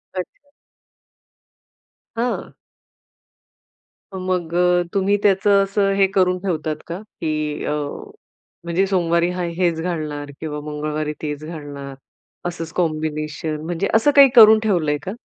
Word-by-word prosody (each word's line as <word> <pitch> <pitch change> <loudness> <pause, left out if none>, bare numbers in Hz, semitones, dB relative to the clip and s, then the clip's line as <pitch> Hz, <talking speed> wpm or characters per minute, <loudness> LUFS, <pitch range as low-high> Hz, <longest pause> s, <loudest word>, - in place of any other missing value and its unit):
अच्छा. 235 +10 -7 1.7
हं. 245 +1 -2 1.7
मग 180 -3 -2
अ, 180 0 +3
तुम्ही 200 +1 +2
त्याचं 200 0 +4
असं 195 0 +1
हे 195 - +4
करून 185 -2 +3
ठेवतात 155 -4 -1
का, 170 +3 -5
की 155 -7 -4
अ, - - -1 0.9
म्हणजे 170 +3 +1
सोमवारी 170 -2 +1
हा 180 0 -3
हेच 170 -3 +1
घालणार 150 -4 -4
किंवा 150 -2 -4
मंगळवारी 150 0 -3
तेच 150 -1 -4
घालणार 145 -4 -8 0.5
असंच 165 -2 -5
कॉम्बिनेशन 155 -2 -2
म्हणजे 175 +3 -1
असं 225 +6 +4
काही 275 -2 +9
करून 220 -1 +9
ठेवलंय 170 -9 +1
का? 190 - -4
170 Hz, 120 wpm, -21 LUFS, 155-195 Hz, 1.7 s, काही